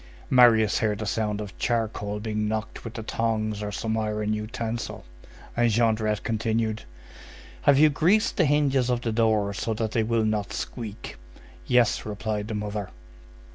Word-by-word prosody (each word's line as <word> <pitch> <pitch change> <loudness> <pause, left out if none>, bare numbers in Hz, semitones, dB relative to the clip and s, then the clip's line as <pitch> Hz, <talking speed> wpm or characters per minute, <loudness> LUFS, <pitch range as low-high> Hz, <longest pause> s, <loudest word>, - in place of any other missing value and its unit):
Marius 115 -4 +5
heard 105 -1 0
a - - -4
sound 105 0 -1
of 100 -4 -8
charcoal 110 -3 -1
being 105 0 -2
knocked 110 0 -4
with 115 - -8
the 110 - -5
tongs 110 -2 -1
or 105 0 -3
some 110 +2 -2
iron 105 0 -1
utensil, 115 +1 -4 0.5
and 120 0 +3
Jondrette 110 -2 +1
continued:— 110 -1 -1 0.8
"Have 140 -1 +5
you 155 +2 +7
greased 195 +10 +2
the 180 - +4
hinges 140 -3 +2
of 120 -1 0
the 115 - -1
door 110 -3 +2
so 110 +2 -2
that 110 -1 -2
they 115 - +1
will 115 0 +1
not 110 0 -1
squeak?" 110 - -6 0.5
"Yes," 125 -3 +3
replied 105 0 -3
the 110 - -4
mother. 105 -1 -4
110 Hz, 160 wpm, -26 LUFS, 105-115 Hz, 0.8 s, you